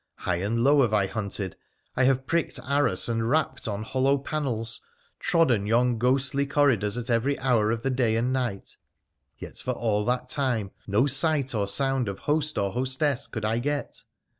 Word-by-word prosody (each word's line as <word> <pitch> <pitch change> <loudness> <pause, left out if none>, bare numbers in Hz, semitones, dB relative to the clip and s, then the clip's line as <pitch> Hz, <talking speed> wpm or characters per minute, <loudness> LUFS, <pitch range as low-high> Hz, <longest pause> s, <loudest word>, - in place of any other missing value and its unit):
High 90 -2 -2
and 110 +6 -1
low 140 +2 +5
have 110 -4 +2
I 100 -2 +3
hunted, 100 -2 -4 0.4
I 130 - +3
have 130 0 +2
pricked 165 -3 -1
arras 140 -9 +1
and 115 -1 -1
rapped 135 -3 0
on 105 0 -3
hollow 135 +4 +1
panels, 125 -6 -3 0.4
trodden 130 - +2
yon 120 +1 +2
ghostly 135 +3 +1
corridors 130 -8 +2
at 120 0 -3
every 125 +5 +1
hour 125 -5 +2
of 115 0 -2
the 135 - 0
day 125 -4 +1
and 120 +3 0
night, 120 -7 -3 0.6
yet - - -9
for 125 - -2
all 110 -3 0
that 125 +1 -1
time 125 -8 -1 0.2
no 105 +6 +3
sight 140 -1 +1
or 105 -3 0
sound 135 +1 0
of 100 - -5
host 150 0 -1
or 100 -1 0
hostess 130 +3 -1
could 110 -2 -5
I 110 +2 +1
get. 145 +3 -3
125 Hz, 180 wpm, -26 LUFS, 110-140 Hz, 0.6 s, low